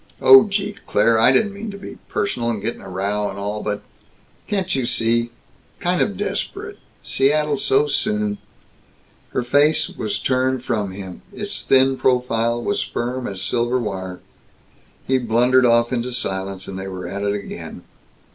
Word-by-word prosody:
"Oh 130 Hz, 0 st, +9 dB
gee 200 Hz, 0 st, -2 dB
Claire, 115 Hz, -1 st, +3 dB
I 115 Hz, -, +6 dB
didn't 205 Hz, +9 st, +2 dB
mean 210 Hz, +2 st, -6 dB
to 200 Hz, -, -7 dB
be 200 Hz, -, -9 dB
personal, 120 Hz, -12 st, -1 dB
and 115 Hz, -3 st, -1 dB
get 115 Hz, +4 st, -2 dB
in -, -, -15 dB
a -, -, -10 dB
row 100 Hz, +2 st, -1 dB
and 95 Hz, -, -7 dB
all, 105 Hz, +1 st, -3 dB
but 105 Hz, -1 st, -3 dB, 0.6 s
can't 190 Hz, -3 st, -1 dB
you 130 Hz, -, 0 dB
see 115 Hz, -1 st, +1 dB, 0.5 s
kind -, -, 0 dB
of -, -, 0 dB
desperate -, -, -4 dB, 0.2 s
Seattle 150 Hz, +2 st, +2 dB
so 140 Hz, +1 st, +2 dB
soon 105 Hz, -7 st, -1 dB, 0.5 s
" -, -, -34 dB
Her 125 Hz, -, 0 dB
face 145 Hz, +5 st, +3 dB
was 105 Hz, -2 st, -3 dB
turned 130 Hz, -1 st, 0 dB
from 105 Hz, -6 st, -1 dB
him; 95 Hz, -1 st, -8 dB
its -, -, -5 dB
thin 135 Hz, 0 st, +4 dB
profile 120 Hz, -2 st, +1 dB
was 205 Hz, -, 0 dB
firm 125 Hz, +1 st, -3 dB
as 95 Hz, -1 st, -4 dB
silver 120 Hz, +5 st, +1 dB
wire. 95 Hz, -6 st, -4 dB, 0.8 s
He 130 Hz, 0 st, +2 dB
blundered 125 Hz, +2 st, +3 dB
off 120 Hz, +1 st, +3 dB
into 125 Hz, 0 st, -2 dB
silence 95 Hz, -4 st, -3 dB
and 95 Hz, 0 st, -6 dB
they 95 Hz, -, -5 dB
were 95 Hz, -2 st, -6 dB
at 100 Hz, +3 st, -5 dB
it 100 Hz, 0 st, 0 dB
again! 100 Hz, -, -7 dB
120 Hz, 170 wpm, -21 LUFS, 100-130 Hz, 0.8 s, Oh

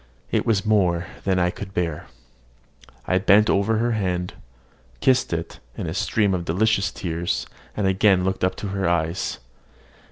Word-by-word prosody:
It -, -, 0 dB
was 110 Hz, -3 st, +2 dB
more 90 Hz, -5 st, +2 dB, 0.2 s
than 95 Hz, -2 st, +2 dB
I 90 Hz, 0 st, +2 dB
could 95 Hz, 0 st, -9 dB
bear. 85 Hz, -3 st, -2 dB, 1.0 s
I 90 Hz, -, +2 dB
bent 105 Hz, +2 st, +5 dB
over 100 Hz, +3 st, +2 dB
her 120 Hz, +2 st, +1 dB
hand, 90 Hz, -5 st, -1 dB, 0.7 s
kissed 130 Hz, -, +2 dB
it 85 Hz, 0 st, -4 dB, 0.2 s
in -, -, -3 dB
a -, -, -3 dB
stream 105 Hz, -3 st, +1 dB
of 90 Hz, -2 st, -1 dB
delicious 100 Hz, +5 st, +1 dB
tears, 85 Hz, -1 st, -2 dB, 0.3 s
and 105 Hz, -, 0 dB
again 95 Hz, -1 st, +3 dB
looked 95 Hz, 0 st, -1 dB
up 95 Hz, 0 st, +1 dB
to 105 Hz, -, -5 dB
her 95 Hz, -2 st, -1 dB
eyes. 85 Hz, +1 st, -1 dB
95 Hz, 160 wpm, -23 LUFS, 90-105 Hz, 1.0 s, bent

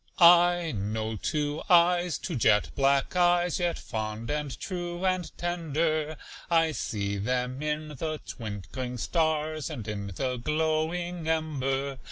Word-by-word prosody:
I 175 Hz, -1 st, +6 dB
know 110 Hz, +1 st, -2 dB
two 150 Hz, +6 st, -2 dB
eyes 175 Hz, -2 st, +4 dB
two -, -, -4 dB
jet 105 Hz, -3 st, +3 dB
black 140 Hz, +3 st, +2 dB
eyes, 175 Hz, -1 st, +3 dB
Yet 175 Hz, -1 st, 0 dB
fond 110 Hz, +2 st, -4 dB
and 150 Hz, -3 st, -3 dB
true 175 Hz, -1 st, -4 dB
and 185 Hz, -2 st, 0 dB
tender. 155 Hz, -2 st, -1 dB, 0.3 s
I 165 Hz, -2 st, +4 dB
see 100 Hz, -8 st, -2 dB
them 125 Hz, +4 st, -1 dB
in 150 Hz, 0 st, -2 dB
the 155 Hz, +2 st, -4 dB
twinkling 115 Hz, +3 st, -5 dB
stars, 155 Hz, +2 st, 0 dB
And 120 Hz, -9 st, -6 dB
in 100 Hz, -1 st, -4 dB
the 125 Hz, +2 st, -1 dB
glowing 160 Hz, +4 st, -1 dB
ember. 140 Hz, -4 st, -1 dB
155 Hz, 130 wpm, -28 LUFS, 125-170 Hz, 0.3 s, I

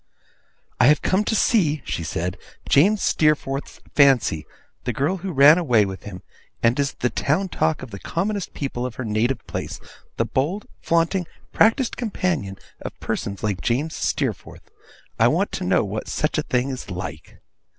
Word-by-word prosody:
'I 120 Hz, -, +6 dB
have 150 Hz, +1 st, +5 dB
come 190 Hz, +3 st, +2 dB
to 220 Hz, -, 0 dB
see,' 160 Hz, -, +2 dB
she 85 Hz, -, -3 dB
said, 85 Hz, +3 st, -3 dB, 0.3 s
'James 195 Hz, +8 st, +4 dB
Steerforth's 145 Hz, -3 st, +1 dB
fancy; 130 Hz, -, +4 dB, 0.4 s
the 125 Hz, -, -2 dB
girl 140 Hz, -, 0 dB
who 190 Hz, +1 st, -5 dB
ran 150 Hz, +3 st, +7 dB
away 120 Hz, -, +3 dB
with 95 Hz, -1 st, -7 dB
him, 90 Hz, -3 st, -8 dB, 0.4 s
and 115 Hz, +4 st, +3 dB
is 140 Hz, -1 st, 0 dB
the 125 Hz, -, -1 dB
town 185 Hz, +7 st, 0 dB
talk 160 Hz, -2 st, 0 dB
of 120 Hz, -, -9 dB
the 100 Hz, -, -7 dB
commonest 200 Hz, -, -3 dB
people 135 Hz, -4 st, -3 dB
of 125 Hz, -2 st, -4 dB
her 130 Hz, -, -5 dB
native 110 Hz, +5 st, 0 dB
place; -, -, -5 dB, 0.4 s
the -, -, +1 dB
bold, 170 Hz, +11 st, -1 dB, 0.2 s
flaunting, 170 Hz, +2 st, +1 dB, 0.3 s
practised 230 Hz, +3 st, +3 dB
companion 175 Hz, -, -2 dB, 0.2 s
of -, -, -7 dB
persons 100 Hz, -1 st, -4 dB
like 100 Hz, -4 st, -1 dB
James 140 Hz, +7 st, -1 dB
Steerforth. -, -, -3 dB, 0.5 s
I -, -, +6 dB
want -, -, +1 dB
to -, -, -4 dB
know -, -, +2 dB
what -, -, -4 dB
such -, -, -1 dB
a -, -, -5 dB
thing 125 Hz, +2 st, +1 dB
is 130 Hz, -6 st, -7 dB
like. 90 Hz, -3 st, -7 dB
140 Hz, 170 wpm, -23 LUFS, 115-175 Hz, 0.5 s, ran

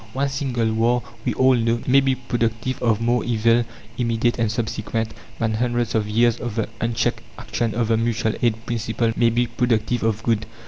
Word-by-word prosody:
One 140 Hz, +2 st, 0 dB
single 125 Hz, -5 st, -1 dB
war 120 Hz, +2 st, +2 dB, 0.2 s
we -, -, 0 dB
all 130 Hz, 0 st, +5 dB
know 115 Hz, -1 st, +1 dB
may 135 Hz, +2 st, +5 dB
be 135 Hz, -1 st, +2 dB
productive 120 Hz, 0 st, -2 dB
of 115 Hz, -2 st, +2 dB
more 120 Hz, 0 st, +1 dB
evil, 115 Hz, 0 st, +2 dB, 0.3 s
immediate 120 Hz, 0 st, +1 dB
and 115 Hz, -2 st, +1 dB
subsequent, 110 Hz, 0 st, -2 dB, 0.2 s
than 115 Hz, -1 st, 0 dB
hundreds 120 Hz, +1 st, 0 dB
of 105 Hz, -2 st, 0 dB
years 115 Hz, +2 st, +3 dB
of 120 Hz, -3 st, -4 dB
the 110 Hz, -2 st, 0 dB
unchecked 115 Hz, -1 st, 0 dB, 0.2 s
action 115 Hz, -3 st, -2 dB
of 115 Hz, -1 st, 0 dB
the 115 Hz, -, +3 dB
mutual 115 Hz, -1 st, 0 dB
aid 115 Hz, -1 st, 0 dB
principle 115 Hz, 0 st, -1 dB
may 115 Hz, -, +4 dB
be 120 Hz, +2 st, +1 dB
productive 120 Hz, 0 st, 0 dB
of 115 Hz, 0 st, 0 dB
good. 110 Hz, -2 st, 0 dB
115 Hz, 185 wpm, -22 LUFS, 115-120 Hz, 0.3 s, all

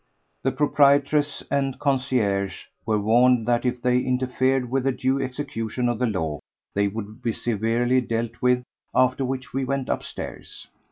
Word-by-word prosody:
The 135 Hz, -, +1 dB
proprietress 145 Hz, +1 st, +3 dB
and 135 Hz, -2 st, 0 dB
concierge 125 Hz, -, 0 dB, 0.2 s
were 110 Hz, -1 st, +2 dB
warned 120 Hz, +2 st, +4 dB
that 120 Hz, +1 st, +2 dB
if 125 Hz, 0 st, -2 dB
they 125 Hz, 0 st, +3 dB
interfered 130 Hz, 0 st, +1 dB
with 135 Hz, 0 st, 0 dB
the 135 Hz, -, +3 dB
due 130 Hz, +1 st, 0 dB
execution 125 Hz, -3 st, -3 dB
of 120 Hz, -2 st, -1 dB
the 125 Hz, -, +2 dB
law 80 Hz, -, -2 dB, 0.3 s
they 100 Hz, 0 st, +2 dB
would 110 Hz, +3 st, -6 dB
be 120 Hz, -, 0 dB
severely 120 Hz, +3 st, +1 dB
dealt 115 Hz, 0 st, -3 dB
with; 125 Hz, 0 st, +3 dB, 0.3 s
after 130 Hz, +1 st, +3 dB
which 130 Hz, 0 st, -4 dB
we 135 Hz, +1 st, 0 dB
went 135 Hz, 0 st, -2 dB
upstairs. -, -, -5 dB
125 Hz, 155 wpm, -24 LUFS, 115-135 Hz, 0.3 s, warned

